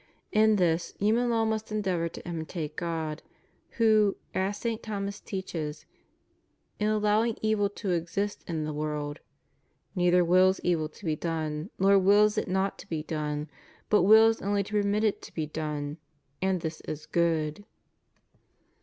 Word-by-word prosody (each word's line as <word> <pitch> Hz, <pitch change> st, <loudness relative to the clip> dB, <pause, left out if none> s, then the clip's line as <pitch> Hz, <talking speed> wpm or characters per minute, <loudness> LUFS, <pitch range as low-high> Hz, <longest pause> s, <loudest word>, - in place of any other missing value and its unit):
In 215 Hz, 0 st, +4 dB
this, 170 Hz, -3 st, +1 dB
human 230 Hz, +4 st, +2 dB
law 225 Hz, -1 st, +2 dB
must 220 Hz, 0 st, -2 dB
endeavor 185 Hz, -6 st, 0 dB
to -, -, -10 dB
imitate 160 Hz, -2 st, -4 dB
God, 160 Hz, -3 st, -3 dB, 0.6 s
who, 215 Hz, -3 st, +4 dB, 0.2 s
as 195 Hz, +2 st, -1 dB
St. 230 Hz, -1 st, -3 dB
Thomas 200 Hz, -2 st, -4 dB
teaches, 165 Hz, -6 st, -5 dB, 0.9 s
in 210 Hz, -, +1 dB
allowing 215 Hz, +1 st, +2 dB
evil 215 Hz, -2 st, +2 dB
to 205 Hz, -1 st, -4 dB
exist 180 Hz, +4 st, -2 dB
in 160 Hz, -3 st, -2 dB
the 155 Hz, 0 st, -3 dB
world, 150 Hz, 0 st, -3 dB, 0.4 s
" -, -, -43 dB
neither 180 Hz, -1 st, +4 dB
wills 185 Hz, +2 st, +4 dB
evil 160 Hz, -3 st, +1 dB
to 180 Hz, -, -14 dB
be 155 Hz, -2 st, +1 dB
done, 155 Hz, +1 st, -3 dB
nor 195 Hz, +1 st, +5 dB
wills 205 Hz, +3 st, +5 dB
it -, -, -1 dB
not 190 Hz, +1 st, -1 dB
to -, -, -12 dB
be 155 Hz, -2 st, -2 dB
done, 150 Hz, -1 st, -3 dB, 0.4 s
but 210 Hz, -, +5 dB
wills 220 Hz, +4 st, +6 dB
only 200 Hz, 0 st, +1 dB
to 210 Hz, +1 st, 0 dB
permit 205 Hz, +1 st, +1 dB
it 215 Hz, -2 st, +1 dB
to -, -, -12 dB
be 155 Hz, -, -1 dB
done; 150 Hz, -1 st, -4 dB, 0.4 s
and 190 Hz, -2 st, +1 dB
this 160 Hz, -1 st, -5 dB
is 155 Hz, 0 st, -5 dB
good." 165 Hz, +1 st, 0 dB
185 Hz, 155 wpm, -28 LUFS, 160-210 Hz, 0.9 s, wills